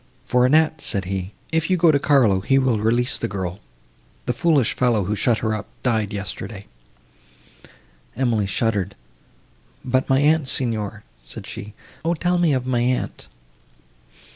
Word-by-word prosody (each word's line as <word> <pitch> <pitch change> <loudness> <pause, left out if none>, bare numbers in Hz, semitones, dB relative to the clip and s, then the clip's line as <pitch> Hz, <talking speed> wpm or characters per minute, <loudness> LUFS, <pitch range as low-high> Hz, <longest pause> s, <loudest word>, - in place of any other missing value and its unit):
"For 125 0 +3
Annette," 155 +1 +3
said 95 -2 0
he,—"if 95 - -3
you 185 - +3
go 170 -1 +5
to 140 - +2
Carlo, 130 -10 +3
he 135 +8 +2
will 130 -5 +2
release 120 +5 +1
the 115 - -1
girl; 95 -3 -4 0.7
the 125 - 0
foolish 145 -3 +2
fellow, 120 -5 +1
who 105 +3 -1
shut 115 +2 +2
her 110 - +1
up, 105 -1 -4 0.2
died 110 -5 0
yesterday." 100 0 -6 1.5
Emily 115 -6 +1
shuddered.—"But 95 - -4
my 135 0 +4
aunt, 150 0 +3
Signor"—said 105 - -2
she, 105 0 -8 0.3
"O 170 +1 +1
tell 175 +2 0
me 170 -3 +3
of 130 -2 0
my 130 -2 0
aunt!" 125 +1 -2
120 Hz, 140 wpm, -22 LUFS, 100-135 Hz, 1.5 s, go